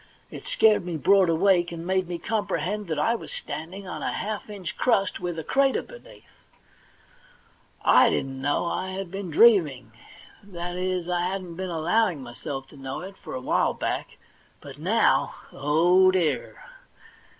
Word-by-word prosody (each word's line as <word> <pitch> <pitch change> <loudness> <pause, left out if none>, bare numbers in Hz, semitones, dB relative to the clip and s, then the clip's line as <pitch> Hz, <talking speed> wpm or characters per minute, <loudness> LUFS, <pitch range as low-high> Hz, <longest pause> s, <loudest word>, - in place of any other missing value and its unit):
It - - -9
scared 220 - +4
me 175 -2 -4
broad 190 +3 +4
awake, 175 +1 +3
and 170 0 -7
made 185 0 0
me 175 -1 -4
comprehend 210 0 -2
that 160 -2 -2
I 185 +10 +2
was 235 - -6
standing 185 +5 -7
on - - -6
a - - -1
half 215 0 -4
inch 195 -5 -6
crust, 200 -6 +1
with 175 -2 -4
a 160 - -4
crater 270 - +2
underneath. - - -14 1.6
I - - +6
didn't 135 0 -2
know 145 +4 0
I 185 +2 -3
had 190 -2 -5
been 195 -1 -5
dreaming 150 - +4 0.3
— - - -22
that 175 +1 -4
is, 180 -1 -2
I 175 0 0
hadn't 185 -2 -5
been 185 +1 -4
allowing 170 -1 +1
myself 135 +2 -7
to 145 - -15
know 135 0 -6
it 190 +2 -9
for - - -9
a 130 - -4
while - - +1
back; - - -3 0.4
but - - -11
7ioiv - - +2 0.2
— - - -22
oh, 170 +6 +4
dear 180 -5 -1
180 Hz, 170 wpm, -25 LUFS, 160-195 Hz, 1.6 s, I